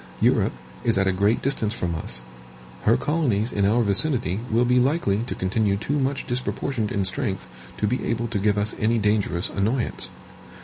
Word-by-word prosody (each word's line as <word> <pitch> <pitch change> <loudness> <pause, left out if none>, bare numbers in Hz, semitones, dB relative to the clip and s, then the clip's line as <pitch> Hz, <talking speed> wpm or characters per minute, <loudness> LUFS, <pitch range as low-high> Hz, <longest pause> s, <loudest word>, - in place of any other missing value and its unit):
Europe - - +3 0.3
is 115 -4 +2
at 95 - +3
a 95 - +3
great 100 +5 +1
distance 115 -5 0
from 85 -5 -2
us. 65 -6 -3 0.6
Her - - +5
colonies 125 -8 0
in 100 -1 +1
our 115 +3 +3
vicinity 105 - +3
will 115 +2 +3
be 125 +1 +4
likely 125 -7 +1
to - - -3
continue 100 +2 0
too 145 +8 -1
much 135 +1 -1
disproportioned 125 -2 -2
in 100 -2 0
strength 95 - -2 0.3
to - - 0
be 125 +5 -1
able 115 0 -1
to 105 -3 -1
give 105 +1 +2
us 105 +1 +1
any 115 +2 +2
dangerous 105 -5 0
annoyance. 115 +5 -1
110 Hz, 180 wpm, -24 LUFS, 100-125 Hz, 0.6 s, Her